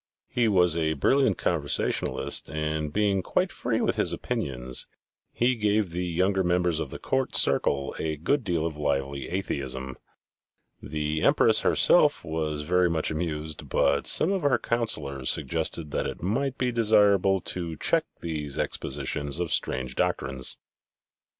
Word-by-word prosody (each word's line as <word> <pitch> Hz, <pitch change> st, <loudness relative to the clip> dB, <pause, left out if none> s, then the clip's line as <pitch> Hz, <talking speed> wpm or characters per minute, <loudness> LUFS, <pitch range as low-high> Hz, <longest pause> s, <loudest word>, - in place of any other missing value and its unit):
He 120 Hz, -2 st, +1 dB
was 90 Hz, -5 st, +4 dB
a 80 Hz, -1 st, 0 dB
brilliant 130 Hz, -, +2 dB
conversationalist -, -, 0 dB
and 75 Hz, -1 st, -2 dB
being 100 Hz, +1 st, +1 dB
quite -, -, 0 dB
free -, -, -2 dB
with -, -, 0 dB
his -, -, +1 dB
opinions, 65 Hz, -1 st, -2 dB, 0.4 s
he 125 Hz, +2 st, +2 dB
gave 105 Hz, -4 st, 0 dB
the 90 Hz, +1 st, -3 dB
younger 95 Hz, +3 st, +1 dB
members 90 Hz, -2 st, +1 dB
of 80 Hz, -, -3 dB
the -, -, -7 dB
court 130 Hz, -1 st, -1 dB
circle 70 Hz, 0 st, +2 dB
a 80 Hz, -1 st, -2 dB
good 125 Hz, -, 0 dB
deal 85 Hz, -5 st, -1 dB
of 80 Hz, -2 st, -4 dB
lively 70 Hz, -2 st, -2 dB
atheism. 65 Hz, -8 st, -4 dB, 0.9 s
The 75 Hz, 0 st, -3 dB
Empress -, -, +4 dB
herself -, -, +4 dB
was 80 Hz, -2 st, -2 dB
very 90 Hz, +2 st, +2 dB
much 80 Hz, -2 st, -1 dB
amused, 80 Hz, -1 st, -4 dB
but -, -, +1 dB
some 170 Hz, -, +5 dB
of 195 Hz, -2 st, 0 dB
her 145 Hz, -3 st, +3 dB
councillors 70 Hz, -, -2 dB
suggested 80 Hz, -3 st, -2 dB
that -, -, -1 dB
it -, -, -7 dB
might 130 Hz, +8 st, -1 dB
be 125 Hz, -1 st, 0 dB
desirable 105 Hz, -4 st, +3 dB
to 85 Hz, -3 st, -4 dB
check -, -, +1 dB, 0.2 s
these 75 Hz, -4 st, -3 dB
expositions 70 Hz, +2 st, -3 dB
of 90 Hz, -2 st, -2 dB
strange 65 Hz, 0 st, -1 dB
doctrines. 65 Hz, -1 st, -1 dB
80 Hz, 145 wpm, -26 LUFS, 75-100 Hz, 0.9 s, some